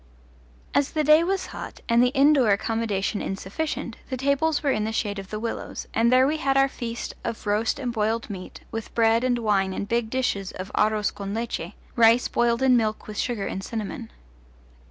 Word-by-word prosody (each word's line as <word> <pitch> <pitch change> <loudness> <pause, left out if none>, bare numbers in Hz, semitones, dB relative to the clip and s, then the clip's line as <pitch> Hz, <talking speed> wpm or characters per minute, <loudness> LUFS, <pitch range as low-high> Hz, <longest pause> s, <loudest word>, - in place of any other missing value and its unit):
As 285 -1 +1
the 310 - +1
day 305 +2 +6
was 385 +2 -1
hot - - -7
and 235 0 +4
the 250 - +5
indoor 275 -4 +5
accommodation 205 -1 0
insufficient, 195 +11 -4
the 260 - -2
tables 280 +4 +1
were 285 - +2
in 215 - 0
the 220 - -1
shade 205 -2 -2
of 195 0 -9
the 215 - -4
willows, 230 +1 -5
and 230 +1 +3
there 255 +1 +6
we 305 +3 +1
had 275 -2 +1
our 270 0 +5
feast 235 -3 -5
of 225 - -5
roast 210 +2 +1
and 250 -4 -3
boiled 225 +1 0
meat, 190 -3 -8
with 225 -1 -6
bread 230 0 +3
and 250 -1 +2
wine 200 -4 +1
and 200 - -4
big 235 0 0
dishes 225 -7 -1
of 185 +1 -7
aros 215 -1 +2
con 200 0 -5
leche 230 +1 -3 0.2
rice 235 0 +5
boiled 235 +1 +1
in 260 -1 +5
milk 220 -2 0
with 210 -1 -5
sugar 235 -5 -1
and 190 - -4
cinnamon. 225 +3 -5
230 Hz, 195 wpm, -25 LUFS, 210-260 Hz, 0.2 s, day